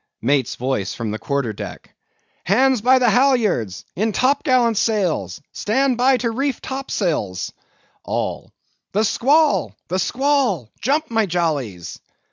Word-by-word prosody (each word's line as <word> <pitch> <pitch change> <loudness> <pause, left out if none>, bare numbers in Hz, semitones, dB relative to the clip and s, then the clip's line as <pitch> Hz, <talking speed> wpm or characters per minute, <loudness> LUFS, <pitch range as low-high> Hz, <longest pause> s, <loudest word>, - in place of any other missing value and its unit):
MATE'S 135 0 +1
VOICE 125 -6 -2
FROM 115 -3 -4
THE 110 - -4
QUARTER 140 -2 -2
DECK. - - -9 0.5
Hands 255 +5 +3
by 255 +3 +5
the 245 -3 +3
halyards! 205 - +1
in 215 +2 0
top 270 +5 +2
gallant 245 -5 +3
sails! 175 - -1
Stand 260 +4 +1
by 255 +2 +3
to 235 -2 -1
reef 270 +2 -1
topsails! 175 - -3 0.5
ALL. - - -3 0.4
The 210 +3 +2
squall! 285 +8 +2
the 185 +2 0
squall! 250 - 0
jump, 285 +5 0
my 225 -2 +2
jollies! 145 - -2
215 Hz, 130 wpm, -20 LUFS, -, 0.5 s, by